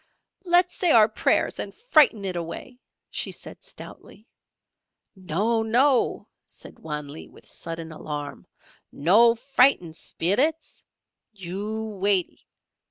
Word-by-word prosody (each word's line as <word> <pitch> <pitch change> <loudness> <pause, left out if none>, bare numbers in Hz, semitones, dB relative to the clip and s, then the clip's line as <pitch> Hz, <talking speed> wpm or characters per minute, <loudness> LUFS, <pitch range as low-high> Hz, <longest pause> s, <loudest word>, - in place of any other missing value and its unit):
"Let's 355 0 +3
say 355 - +1
our 220 -7 +6
prayers 220 - 0
and - - -5
frighten 305 - +3
it 185 -2 -3
away," 175 +9 -7 0.3
she - - -3
said, - - -10
stoutly. 215 +4 -13 0.9
"No! 195 +6 -1
No!" 245 +4 +2 0.2
said - - -12
Wan 150 -2 -6
Lee, 145 +3 -10
with - - -19
sudden 165 -1 -7
alarm. 145 -2 -7 0.4
"No 220 +10 +4
frighten 250 - +2
Spillits! 255 - -1 0.5
You 205 +3 -6
waitee! 195 -3 0
210 Hz, 110 wpm, -24 LUFS, 170-250 Hz, 0.9 s, our